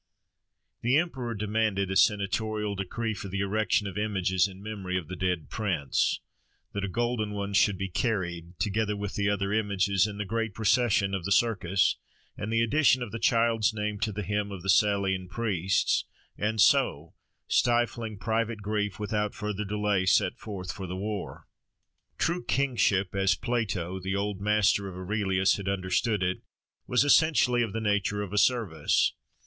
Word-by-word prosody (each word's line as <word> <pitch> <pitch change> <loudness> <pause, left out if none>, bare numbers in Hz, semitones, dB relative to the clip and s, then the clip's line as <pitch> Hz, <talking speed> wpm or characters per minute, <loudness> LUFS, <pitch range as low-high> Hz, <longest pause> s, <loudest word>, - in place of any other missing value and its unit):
The 125 +4 +3
emperor 130 -8 -2
demanded 105 -2 0
a - - -1
senatorial 105 +1 +1
decree 105 +4 -3
for 100 0 -7
the 95 +1 -3
erection 105 +1 +1
of 100 0 -4
images 95 -3 +1
in 95 0 -12
memory 100 -4 -3
of 85 -4 -5
the 90 - -5
dead 90 -4 -1
prince; 85 -11 0 0.5
that 100 - -3
a - - -1
golden 115 -1 -1
one 100 0 -4
should 100 -1 +3
be 95 +1 -3
carried, 90 -5 -2
together 105 0 -1
with 100 -1 -4
the 100 0 0
other 100 0 -1
images, 100 -2 +2
in 105 -1 -7
the 105 - -3
great 115 0 -2
procession 110 -3 +2
of 95 -3 -2
the 100 - -4
Circus, 95 -4 +2 0.4
and 105 - -5
the 115 0 +2
addition 130 +1 +3
of 115 - -7
the 115 - -5
child's 115 -1 +2
name 105 -1 -3
to 110 - -1
the 105 +1 -4
Hymn 105 +1 -2
of 95 -3 -7
the 95 - -4
Salian 95 -2 +2
Priests: 95 -3 0 0.3
and 110 +1 -2
so, 80 -4 +3 0.3
stifling 120 -2 +1
private 110 0 -2
grief, 105 -1 -2
without 105 0 -2
further 105 -1 -3
delay 105 -2 0
set - - +3
forth 95 -4 -6
for 95 -2 -7
the 90 +1 -5
war. 105 0 -5 0.7
True 175 +2 0
kingship, 115 -8 +1
as 95 -2 +2
Plato, 100 -6 -2
the 95 +1 -3
old 100 -1 -2
master 105 -1 +2
of 90 - -9
Aurelius, 95 0 +1
had 100 -1 -4
understood 100 +2 0
it, 90 +1 -1 0.5
was 125 +2 +3
essentially 145 -5 +4
of 115 -3 -1
the 115 - -3
nature 105 -1 0
of 100 0 -7
a 105 - +3
service. 105 - +2
105 Hz, 170 wpm, -28 LUFS, 95-110 Hz, 0.7 s, essentially